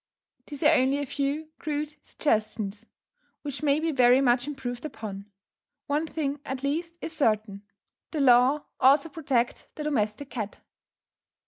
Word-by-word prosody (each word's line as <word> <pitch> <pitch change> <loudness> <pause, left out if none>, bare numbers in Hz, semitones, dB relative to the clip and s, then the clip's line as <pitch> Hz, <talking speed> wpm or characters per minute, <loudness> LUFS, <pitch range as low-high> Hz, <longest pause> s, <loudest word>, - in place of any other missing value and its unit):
These 290 -1 -6
are 305 +2 +6
only 265 -1 +3
a 285 - -2
few 285 +3 -2
crude 300 0 -3
suggestions, 215 -4 -1 0.6
which 285 -2 -5
may 290 -1 +3
be 325 +1 0
very 250 -2 +5
much 250 0 +3
improved 245 -4 -5
upon; 210 -8 -7 0.6
one 295 +3 0
thing 290 -2 -2
at 265 0 -5
least 330 +4 -2
is 325 - -5
certain, 215 -7 +1 0.5
the 315 - -3
law 260 +2 +5 0.2
ought 275 +3 +6
to 325 - -10
protect 270 -6 -1
the 305 - -5
domestic 260 -2 -1
cat. 220 -4 -5
275 Hz, 145 wpm, -27 LUFS, 240-300 Hz, 0.6 s, are